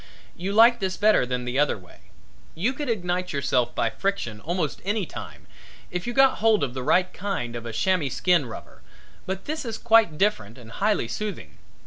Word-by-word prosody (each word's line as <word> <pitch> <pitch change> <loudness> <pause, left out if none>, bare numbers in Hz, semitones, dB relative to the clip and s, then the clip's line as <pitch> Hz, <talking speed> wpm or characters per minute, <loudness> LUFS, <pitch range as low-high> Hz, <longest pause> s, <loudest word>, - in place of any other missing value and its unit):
You 185 +3 -4
like 230 +3 +6
this 190 -2 -2
better 210 -11 +4
than 125 0 -2
the 125 +2 -1
other 145 -5 +2
way. 90 -3 -19 0.5
You 210 +11 0
could 290 0 -4
ignite 180 -4 -1
yourself 130 -4 0
by - - +1
friction 195 - -2
almost 170 -2 -2
any 205 +1 -1
time, - - -9 0.5
if 180 +4 -4
you 240 - -2
got 270 +1 +4
hold 220 -4 +3
of 125 -3 -2
the 130 - -4
right 180 +7 +2
kind 180 -12 -3
of 120 0 -6
a - - -5
chamois 155 +6 +1
skin 170 0 +2
rubber, 115 - -10 0.5
but 190 +1 -4
this 310 +1 -3
is 225 -3 -4
quite 225 -9 +4
different 120 - 0
and 115 -2 -13
highly 205 - 0
soothing. 175 - -6
180 Hz, 190 wpm, -25 LUFS, 130-215 Hz, 0.5 s, like